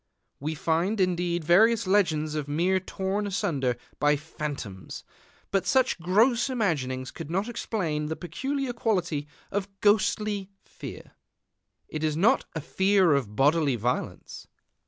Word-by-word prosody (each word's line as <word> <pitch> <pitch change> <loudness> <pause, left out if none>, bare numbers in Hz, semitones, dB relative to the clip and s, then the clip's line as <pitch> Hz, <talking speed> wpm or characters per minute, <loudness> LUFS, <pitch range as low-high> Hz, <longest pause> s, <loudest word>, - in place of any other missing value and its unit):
We 155 +3 -3
find, 170 +8 0
indeed, 175 -2 +1
various 210 +8 +5
legends 165 -6 +2
of 150 -2 -3
men 175 +6 +1
torn 195 +2 -2
asunder 140 -10 0 0.2
by 150 0 +4
phantoms; 145 - -6 0.5
but 195 -1 +1
such 260 -7 +2
gross 225 +9 +3
imaginings 140 - -1
could - - -8
not 195 +6 -1
explain 170 -10 -2
the 160 - -2
peculiar 265 - -3
quality 180 -10 -1 0.2
of 195 -1 -1
ghostly 205 -1 +2
fear. - - -10 0.8
It 155 0 -5
is 155 -1 0
not 200 +7 +3
a 160 - -2
fear 190 0 +3
of 120 -7 -1
bodily 145 0 +3
violence. 120 +3 -3
175 Hz, 130 wpm, -27 LUFS, 150-205 Hz, 0.8 s, various